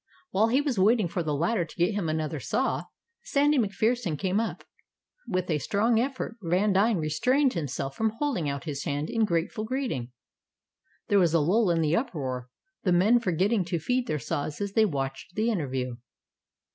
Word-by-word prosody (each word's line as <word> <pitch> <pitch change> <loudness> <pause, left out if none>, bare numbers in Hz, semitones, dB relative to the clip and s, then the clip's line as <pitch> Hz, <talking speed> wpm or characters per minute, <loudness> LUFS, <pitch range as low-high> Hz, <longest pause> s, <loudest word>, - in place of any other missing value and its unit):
While 215 +3 +3
he 255 +5 +3
was 275 -8 -1
waiting 215 0 +4
for 175 +1 -2
the 155 -3 -1
latter 175 +6 +1
to 165 - -11
get 175 +4 +1
him 195 -6 -1
another 155 -1 -2
saw, 135 - -1 0.4
Sandy 290 0 +2
MacPherson 215 -4 0
came 190 +3 0
up. 225 - -3 0.6
With 185 -3 -1
a 150 - +1
strong 220 - +2
effort 260 -2 -3
Vandine 195 +4 +2
restrained 250 - +2
himself 135 -4 -4
from 220 -1 +1
holding 235 - -1
out 140 -1 -4
his 145 -3 -4
hand 145 -1 -2
in 225 -1 +2
grateful 180 +5 -1
greeting. 220 - -3 1.0
There 205 -2 +5
was 170 -3 +3
a - - +5
lull 190 +7 +3
in 165 -1 +2
the 155 +1 +2
uproar, 130 - -3 0.3
the 185 - +1
men 200 +7 +5
forgetting 195 +1 +1
to 175 0 -1
feed 250 +10 -1
their 155 - 0
saws 145 +1 -3
as 200 -1 -3
they 220 0 +5
watched 135 -1 -4
the 225 +2 +1
interview. 130 - -2
185 Hz, 180 wpm, -27 LUFS, 155-225 Hz, 1.0 s, There